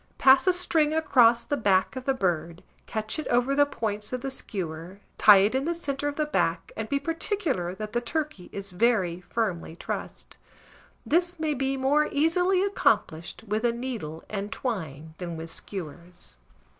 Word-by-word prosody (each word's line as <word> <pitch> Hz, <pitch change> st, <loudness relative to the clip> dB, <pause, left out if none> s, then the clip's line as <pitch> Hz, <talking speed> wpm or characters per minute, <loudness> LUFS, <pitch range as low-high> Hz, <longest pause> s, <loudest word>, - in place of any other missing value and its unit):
Pass 265 Hz, +6 st, +6 dB
a 370 Hz, -, +6 dB
string 320 Hz, -4 st, +2 dB
across 240 Hz, -7 st, +4 dB
the 290 Hz, -, 0 dB
back 200 Hz, -3 st, +2 dB
of 260 Hz, -1 st, -6 dB
the 270 Hz, -, +2 dB
bird, 170 Hz, -5 st, -2 dB, 0.2 s
catch 220 Hz, +5 st, -3 dB
it 310 Hz, -, -4 dB
over 245 Hz, +3 st, +2 dB
the 285 Hz, +1 st, +4 dB
points 210 Hz, -5 st, -3 dB
of 250 Hz, -1 st, -3 dB
the 270 Hz, -, -4 dB
skewer, 180 Hz, -6 st, -6 dB, 0.2 s
tie 210 Hz, -2 st, +9 dB
it 210 Hz, -, 0 dB
in 265 Hz, +2 st, 0 dB
the 340 Hz, +1 st, 0 dB
centre 290 Hz, -4 st, -3 dB
of 290 Hz, -, -2 dB
the 305 Hz, -, 0 dB
back, 170 Hz, -, -1 dB
and 220 Hz, 0 st, -4 dB
be 280 Hz, -, +1 dB
particular 325 Hz, -, -2 dB
that 215 Hz, +1 st, -6 dB
the 240 Hz, -, +1 dB
turkey 300 Hz, -, -3 dB
is 200 Hz, 0 st, -6 dB
very 185 Hz, -4 st, +1 dB
firmly 195 Hz, -8 st, -2 dB
trussed. -, -, -6 dB, 0.7 s
This 350 Hz, +1 st, +1 dB
may 310 Hz, -1 st, 0 dB
be 270 Hz, 0 st, -1 dB
more 290 Hz, +3 st, +2 dB
easily 355 Hz, +5 st, +2 dB
accomplished 175 Hz, -, 0 dB
with 215 Hz, +2 st, -1 dB
a 240 Hz, -, +3 dB
needle 230 Hz, -11 st, -5 dB
and 205 Hz, 0 st, -4 dB
twine 160 Hz, -, -4 dB
than 170 Hz, -2 st, -5 dB
with 165 Hz, 0 st, -6 dB
skewers. 175 Hz, -, -7 dB
235 Hz, 175 wpm, -27 LUFS, 185-290 Hz, 0.7 s, tie